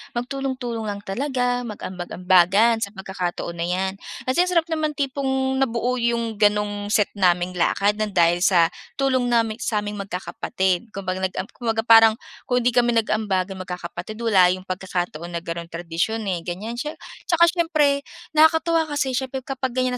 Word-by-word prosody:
magtulong-tulong 245 -3 -3
lang 200 0 -5
talaga 245 +2 -1
mag-ambag-ambagan 185 +3 +2
sa 205 -1 -4
pagkakataon 180 -3 -4
na 170 - -1
'yan. 190 +1 -1 0.3
Kasi 345 +8 +2
ang 365 - -2
sarap 335 - +5
naman 310 -2 -1
tipong 265 -1 -1
nabuo 245 0 0
yung 235 -2 -1
gano'ng 205 -1 +1
set 210 -1 +2
naming 180 -2 +2
lakad 205 +4 +2
ng 210 -3 -2
dahil 170 0 +4
sa 175 -3 +4 0.2
tulong 260 -3 +1
naming 230 -1 +1
sa'ming 210 -2 -2
magkakapatid. 190 0 -2
Kumbaga 185 -1 -3
nag 190 -1 -2
am 185 - -2
kumbaga 225 -2 -2
parang 225 -1 +7 0.3
kung 245 -1 +1
'di 245 - +3
kami 240 -1 +2
nag-ambagan 200 -4 0
magkakapatid 180 +2 -6
wala 195 -6 +5
yung 185 - -11
pagkakataon 180 -3 -4
na 170 - -4
gano'n 170 0 -5
tradisyon 170 +7 -2
eh, 185 -4 -1
ganyan. 205 +8 -5
Siye 300 +3 -4 0.3
tsaka 340 0 +5
siyempre 310 -5 +2 0.3
nakakatuwa 320 +1 +4
kasi 290 -2 -1
siyempre 260 +1 -2
kapag 260 -1 -4
ganyan 255 -1 0
220 Hz, 155 wpm, -23 LUFS, 185-255 Hz, 0.3 s, parang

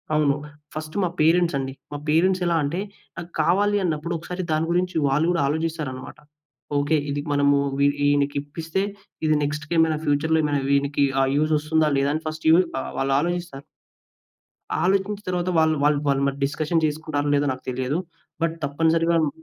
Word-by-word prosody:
అవును. 145 -2 +3 0.4
ఫస్ట్ 155 0 -6
మా 180 - +1
పేరెంట్స్ 170 0 +3
అండి. 135 0 -3 0.2
మా 145 - -4
పేరెంట్స్ 180 +4 +3
ఎలా 170 -1 +2
అంటే, 150 +6 -2 0.4
నాకు 170 - -7
కావాలన్నప్పుడు 175 -2 +1
ఒకసారి 180 +3 -5
దాని 155 +1 +1
గురించి 180 +1 0
వాళ్ళు 145 +4 +2
కూడా 170 - +1
ఆలోచిస్తారన్నమాట. 150 -4 -3 0.6
ఓకే. 145 +2 +2
ఇది 145 0 -2
మనము 145 0 +3 0.2
వీ 140 - +4 0.2
ఈ - - +3
ఈయనకి 145 0 +2
ఇప్పిస్తే, 165 +5 -4 0.4
ఇది 155 0 +3
నెక్స్ట్‌కేమైనా 155 +2 +1
ఫ్యూచర్‌లో 155 +2 +2
ఏమైనా 145 -2 0
వీనికి 140 0 +2 0.2
ఆహ్, 135 - +2
యూజ్ 155 +1 +2
వస్తుందా? 155 +1 +1
లేదా? 140 +1 +2
అని 155 - -4
ఫస్ట్ 155 0 -6
యూ - - +8 0.3
ఆహ్, - - -6
వాళ్ళాలోచిస్తారు. 145 +2 -1 1.2
ఆలోచించిన 195 +2 0
తరువాత 180 0 -1
వాళ్ 160 0 +4
వాళ్ళు 145 0 +3
వాళ్లుమరి 140 0 +1
డిస్కషన్ 155 +3 -1
చేసుకుంటారో 150 -1 -2
లేదో 145 0 +1
నాకు 130 - -12
తెలియదు. 130 +5 -1 0.4
బట్ 165 0 0
తప్పనిసరిగా 165 +3 +2
మ్ - - 0
155 Hz, 160 wpm, -23 LUFS, 145-165 Hz, 1.2 s, యూ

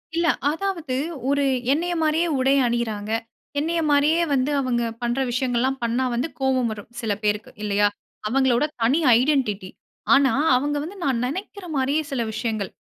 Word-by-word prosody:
இல்ல 340 0 +2 0.2
அதாவது, 330 -6 -3 0.3
ஒரு 285 0 +2 0.3
என்னய 350 +3 -1
மாரியே 320 +2 +2
உடை 270 +2 +3
அணியிறாங்க. 220 -3 -2 0.5
என்னய 330 +2 0
மாரியே 295 +4 +3
வந்து 270 +1 +1
அவங்க 240 -2 0 0.2
பண்ற 240 +2 -1
விஷயங்கள்லாம் 255 +1 0
பண்ணா 240 +3 0
வந்து 245 +7 0
கோபம் 260 -3 +1
வரும் 210 -1 -8
சில 220 -3 -1
பேருக்கு, 210 +1 -1
இல்லயா? 205 0 +2 0.4
அவங்களோட 260 +1 +2 0.2
தனி 260 +8 +3 0.2
ஐடென்டிட்டி 245 -9 0 0.4
ஆனா 275 -1 +5 0.2
அவங்க 290 +3 0
வந்து 340 +7 -7
நான் 250 -3 0
நினைக்கிற 380 +6 -6
மாரியே 275 +3 +1
சில 265 -3 -1
விஷயங்கள். 220 -5 -2
265 Hz, 145 wpm, -23 LUFS, 235-295 Hz, 0.5 s, ஆனா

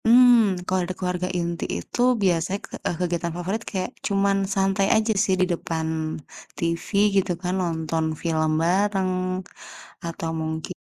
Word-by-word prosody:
Mmm, 235 -4 +6
kalau 185 0 +1
ada - - -1
keluarga 180 0 -2
inti 170 -1 -2
itu 85 - -4 0.2
biasanya 180 +1 +1
ke - - -21
eee, - - 0
kegiatan 170 -1 -1
favorit 190 +5 -2
kayak 185 -2 -3 0.2
cuman 200 0 +2 0.2
santai 195 0 +2
aja 220 0 +2
sih 190 - +2
di - - +5
depan 160 -1 -3 0.7
TV 170 0 -2 0.3
gitu 190 -1 +2
kan. 180 -1 -1
Nonton 160 -2 -1 0.2
film 160 -2 +1
bareng 190 +2 +2 0.9
atau 165 -1 -4
mungkin 160 +2 -4
180 Hz, 145 wpm, -24 LUFS, 165-195 Hz, 0.9 s, Mmm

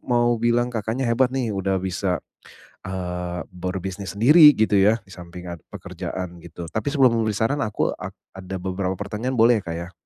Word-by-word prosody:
mau 120 -1 +2
bilang 120 +1 +1
Kakaknya 115 +3 -2
hebat 125 +2 +3
nih 130 -4 -2
udah 95 -1 0
bisa, 95 0 -1 0.7
eee, 90 -1 -4
berbisnis 95 +2 -5
sendiri, 150 +8 +8
gitu 110 -1 +2
ya, 105 +3 +4
di 100 - -14
samping 90 0 -10
ada 85 -2 -7
pekerjaan 90 -2 -6
gitu. 85 0 -9
Tapi 110 +3 -2
sebelum 135 -5 +4
memberi 110 -2 -1
saran 140 +6 0
aku 105 -4 0
ak - - -8 0.2
ada 95 0 -7
beberapa 95 0 -3
pertanyaan 110 +5 -3
boleh 115 -1 +5
ya, - - -24
Kak, 85 - -3
ya? 85 +1 -7
100 Hz, 180 wpm, -23 LUFS, 90-120 Hz, 0.7 s, sendiri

